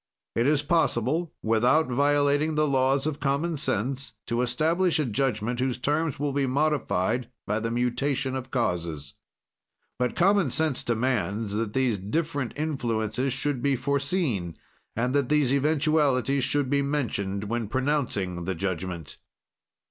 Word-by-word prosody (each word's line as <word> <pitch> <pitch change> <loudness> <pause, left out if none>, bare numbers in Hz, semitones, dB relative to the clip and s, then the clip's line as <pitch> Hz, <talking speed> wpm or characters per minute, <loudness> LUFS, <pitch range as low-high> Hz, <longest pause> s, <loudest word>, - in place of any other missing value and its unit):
"It 115 +3 +2
is 145 -1 +2
possible, 160 0 +1
without 120 +8 +3
violating 145 +3 +2
the 155 0 +2
laws 135 0 +2
of 155 -2 -2
common 145 +4 0
sense, 135 +1 -2
to 120 +1 -1
establish 160 +9 +1
a 155 - +1
judgment 120 -1 -1
whose 125 -1 0
terms 150 +3 -1
will 145 -1 -1
be 140 -1 +1
modified 125 -5 0 0.2
by 105 +2 0
the 115 +1 -2
mutation 130 +3 0
of 130 0 -5
causes. 85 - -2 0.9
"But 125 -1 0
common 195 -3 +3
sense 155 0 +1
demands 110 -4 -1
that 105 0 -2
these 125 -6 +1
different 145 - -2
influences 125 -4 -1
should 135 0 -1
be 140 +1 +2
foreseen, 135 - -1 0.4
and 125 +3 0
that 140 -3 +1
these 145 -3 +3
eventualities 140 -2 +2
should 140 +2 +1
be 140 +1 +2
mentioned 115 -9 -2
when 115 +1 -2
pronouncing 115 - -1
the 95 0 -2
judgment." 90 -3 -4
130 Hz, 140 wpm, -26 LUFS, 115-145 Hz, 0.9 s, without